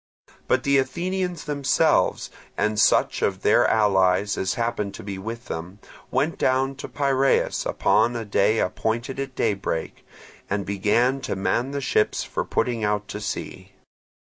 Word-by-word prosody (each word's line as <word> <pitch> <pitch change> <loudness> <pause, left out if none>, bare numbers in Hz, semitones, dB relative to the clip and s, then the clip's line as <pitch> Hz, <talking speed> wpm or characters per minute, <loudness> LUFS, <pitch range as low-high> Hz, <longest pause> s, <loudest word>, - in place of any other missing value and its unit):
But - - +2
the 140 0 +4
Athenians 180 +4 -2
themselves, 140 -3 +1 0.3
and 105 0 0
such - - +3
of - - -1
their - - +4
allies 100 -1 +3
as 95 - -1
happened 110 -4 -2
to - - -9
be 100 -1 -6
with 115 +4 -6
them, 85 +4 -6 0.3
went 140 +6 0
down 130 +1 +1
to - - -6
Piraeus 135 -1 +1
upon 120 +1 +2
a 115 -1 -4
day 105 +2 +2
appointed 115 +7 -2
at 135 -1 -5
daybreak, 95 -6 -2 0.5
and 100 0 -1
began 115 +7 +1
to 130 - -3
man 95 +7 0
the 140 0 -3
ships 105 -4 +1
for - - -3
putting 120 -3 -1
out 105 0 0
to 105 - -5
sea. 105 - -6
115 Hz, 150 wpm, -24 LUFS, 100-135 Hz, 0.5 s, the